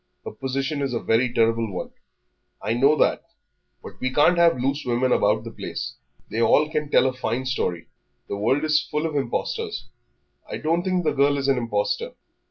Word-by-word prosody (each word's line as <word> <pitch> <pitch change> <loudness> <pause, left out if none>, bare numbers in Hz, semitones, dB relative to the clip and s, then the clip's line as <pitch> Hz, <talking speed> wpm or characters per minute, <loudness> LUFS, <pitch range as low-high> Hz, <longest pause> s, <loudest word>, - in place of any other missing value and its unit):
Her - - -5
position 135 +2 -3
is 135 -3 -1
a - - 0
very 120 +3 +1
terrible 115 -2 +1
one." 90 - -5 0.7
"I 110 +3 -1
know 135 +6 +4
that.... - - +2 0.6
But - - -11
we 130 - -1
can't 160 +6 +4
have 170 -5 +5
loose 135 +4 -1
women 125 +1 0
about - - +2
the - - -7
place. - - -5 0.4
They 115 - -1
all 150 +6 +4
can 150 -2 -2
tell 130 - +4
a 130 - +1
fine 130 0 -2
story; 90 -10 -2 0.4
the - - -3
world 120 +9 +1
is 155 0 +3
full 150 +2 -3
of 160 -2 -3
impostors." 425 - -3 0.6
"I - - -4
don't 165 +3 0
think 185 -1 0
the 155 - +1
girl 140 +1 +3
is 140 -1 -1
an 135 -2 +3
impostor." 475 - -1
135 Hz, 190 wpm, -24 LUFS, 120-155 Hz, 0.7 s, have